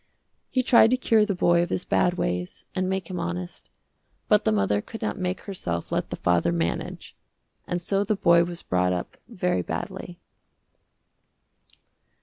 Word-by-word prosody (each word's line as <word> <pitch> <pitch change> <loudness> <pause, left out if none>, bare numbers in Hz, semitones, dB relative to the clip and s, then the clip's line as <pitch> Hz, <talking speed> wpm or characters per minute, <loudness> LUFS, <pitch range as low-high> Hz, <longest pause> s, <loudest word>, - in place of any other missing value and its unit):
He 255 - +1
tried 235 -3 +6
to 255 - +3
cure 225 -4 +3
the 200 - -1
boy 175 -1 +3
of 175 - -1
his 180 - -2
bad 180 0 +2
ways, 90 - -3
and 185 -1 -1
make 190 -2 -2
him 180 - -4
honest, 85 +1 -5 0.6
but - - +3
the - - +3
mother 105 0 +1
could 225 - -8
not 215 - -2
make 185 0 -2
herself 85 - -4
let - - -1
the - - -3
father 85 0 +2
manage, 85 0 -3 0.5
and 175 - -1
so 195 +3 0
the 210 +1 0
boy 170 -3 +5
was 175 0 -6
brought 90 0 +1
up 90 - -4
very 90 - -1
badly. - - -6
175 Hz, 165 wpm, -25 LUFS, -, 0.6 s, tried